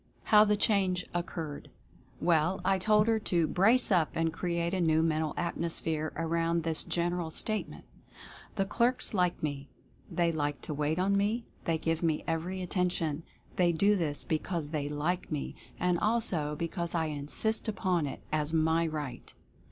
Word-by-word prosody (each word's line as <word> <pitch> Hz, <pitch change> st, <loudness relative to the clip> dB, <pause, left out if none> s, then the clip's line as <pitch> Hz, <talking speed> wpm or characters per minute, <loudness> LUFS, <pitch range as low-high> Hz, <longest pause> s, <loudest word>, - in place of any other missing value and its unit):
HOW 210 Hz, -1 st, +6 dB
THE 210 Hz, 0 st, +2 dB
CHANGE 190 Hz, -4 st, +1 dB
OCCURRED. 165 Hz, -4 st, -4 dB, 0.5 s
Well, 170 Hz, +2 st, +2 dB
I 190 Hz, 0 st, +3 dB
told 210 Hz, +2 st, +4 dB
her 225 Hz, -1 st, +2 dB
to 175 Hz, -5 st, +1 dB
"brace 220 Hz, +9 st, +4 dB
up" 170 Hz, -5 st, +3 dB
and 165 Hz, -1 st, 0 dB
create 170 Hz, 0 st, -1 dB
a 185 Hz, -, 0 dB
new 160 Hz, -1 st, +3 dB
Mental 155 Hz, -1 st, 0 dB
Atmosphere, 165 Hz, -2 st, -2 dB
around 165 Hz, +1 st, 0 dB
this 160 Hz, -1 st, +1 dB
general 175 Hz, -1 st, -1 dB
Statement: 215 Hz, +6 st, -2 dB, 0.7 s
"The 195 Hz, -, +1 dB
clerks 235 Hz, +5 st, 0 dB
like 180 Hz, -5 st, +1 dB
me; 145 Hz, -2 st, -3 dB, 0.4 s
they 170 Hz, -2 st, +1 dB
like 145 Hz, -3 st, -2 dB
to -, -, -4 dB
wait 150 Hz, +2 st, -1 dB
on 195 Hz, +2 st, +2 dB
me; 210 Hz, +4 st, 0 dB, 0.2 s
they 165 Hz, -1 st, +1 dB
give 165 Hz, 0 st, -1 dB
me 160 Hz, -3 st, 0 dB
every 175 Hz, +3 st, -2 dB
attention; 175 Hz, -4 st, -1 dB, 0.4 s
they 175 Hz, -1 st, +4 dB
do 200 Hz, +6 st, +3 dB
this 155 Hz, -6 st, -1 dB
because 160 Hz, -1 st, -2 dB
they 145 Hz, -2 st, -2 dB
LIKE 155 Hz, +6 st, -2 dB
me, 150 Hz, -2 st, -3 dB, 0.3 s
and 180 Hz, -1 st, +1 dB
also 175 Hz, -10 st, 0 dB
because 170 Hz, +2 st, -3 dB
I 160 Hz, -2 st, 0 dB
INSIST 150 Hz, +11 st, 0 dB
UPON 180 Hz, -7 st, 0 dB
IT -, -, -7 dB
as 155 Hz, 0 st, 0 dB
my 160 Hz, +1 st, +2 dB
Right 150 Hz, -5 st, -5 dB
170 Hz, 160 wpm, -30 LUFS, 155-185 Hz, 0.7 s, HOW